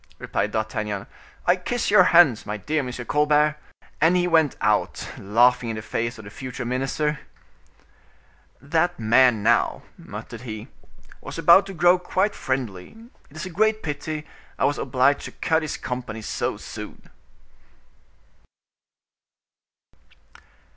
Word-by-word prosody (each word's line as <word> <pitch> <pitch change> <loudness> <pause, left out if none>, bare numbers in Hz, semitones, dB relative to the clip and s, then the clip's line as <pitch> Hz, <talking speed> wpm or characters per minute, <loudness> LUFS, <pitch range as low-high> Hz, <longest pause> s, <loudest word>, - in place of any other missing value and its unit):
replied 105 - -2
D'Artagnan. 105 -2 -3 0.4
"I 175 - +5
kiss 210 +5 -2
your 195 -3 +7
hands, 165 -11 +5
my 105 0 -4
dear 150 +8 -2
M. 130 -3 -3
Colbert." 150 +1 +2 0.4
And 165 +3 +4
he 175 - +2
went 160 -5 +3
out, - - 0
laughing 120 +4 +3
in 110 - -3
the 110 - -6
face 115 +2 -3
of 110 - -11
the 100 - -11
future 130 +2 -6
minister. 135 +4 -1 1.4
"That 165 +5 0
man, 115 0 +4
now," 115 +1 +2 0.2
muttered 115 - -9
he, 110 0 -7 0.5
"was - - -8
about 185 +3 +6
to 195 - -8
grow 175 +2 +4
quite 190 +3 0
friendly; 125 - -4 0.3
it 145 - -19
is 155 - -5
a 185 - -7
great 215 +4 +1
pity 150 +1 -4 0.3
I - - +1
was 145 - 0
obliged 135 +2 +1
to - - -7
cut 160 0 0
his 155 - -4
company 120 -3 -5
so - - -2
soon." - - -9
140 Hz, 135 wpm, -23 LUFS, 115-165 Hz, 1.4 s, your